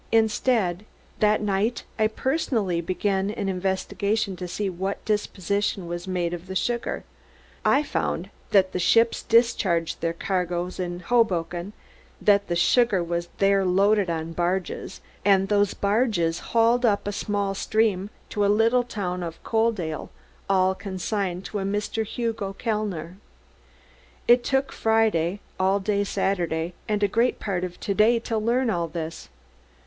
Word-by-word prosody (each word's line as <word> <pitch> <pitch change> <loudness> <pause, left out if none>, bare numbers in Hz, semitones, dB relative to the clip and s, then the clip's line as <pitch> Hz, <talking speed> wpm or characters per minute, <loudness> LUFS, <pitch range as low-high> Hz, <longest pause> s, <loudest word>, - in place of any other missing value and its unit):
Instead, 220 -4 +2 0.4
that 210 0 +3
night 210 +3 0 0.2
I 215 - +4
personally 220 - -1
began 190 +2 0
an 205 -2 -3
investigation 195 +2 -1
to 180 - -5
see 200 +3 -2
what 190 +2 -4
disposition 200 -2 -1
was 175 +2 -5
made 175 -2 -1
of 175 +1 -7
the 190 - -6
sugar. 235 +4 -1 0.6
I 280 +2 +4
found - - -2 0.2
that 190 -2 +4
the - - -2
ships 230 +6 +3
discharged 200 -8 +2
their 165 0 0
cargoes 180 0 -2
in 175 -1 -3
Hoboken, 180 -4 0 0.5
that 200 -1 +3
the 175 - -1
sugar 200 +1 +3
was 170 0 -3
there 195 0 +3
loaded 195 +1 +3
on 165 0 -3
barges, 175 +2 -2 0.2
and 195 -1 +4
those 205 -1 +2
barges 200 -6 +1
hauled 235 +2 +2
up 205 -4 +2
a - - 0
small 200 -1 -1
stream 205 -1 +1 0.2
to - - -6
the 200 - +3
little 225 +4 +4
town 185 -6 -4
of 165 -1 -5
Coaldale, 220 -9 -1 0.4
all 190 -1 +3
consigned 190 -1 -3
to 210 - -4
a - - -2
Mr. 205 +3 -1
Hugo 225 -4 -3
Kellner. 195 -6 -3 1.1
"It 240 0 +6
took 270 +1 0
Friday, 210 -5 +1 0.2
all 190 +2 +3
day 200 0 0
Saturday, 175 -4 -1 0.2
and 210 -1 +1
a - - +5
great 230 +5 +1
part 185 -4 -2
of 180 -1 -5
to 200 - -1
day 220 +4 +4
to 225 -1 -1
learn 235 +2 +1
all 170 -4 -1
this. 160 - -6
195 Hz, 145 wpm, -25 LUFS, 180-220 Hz, 1.1 s, It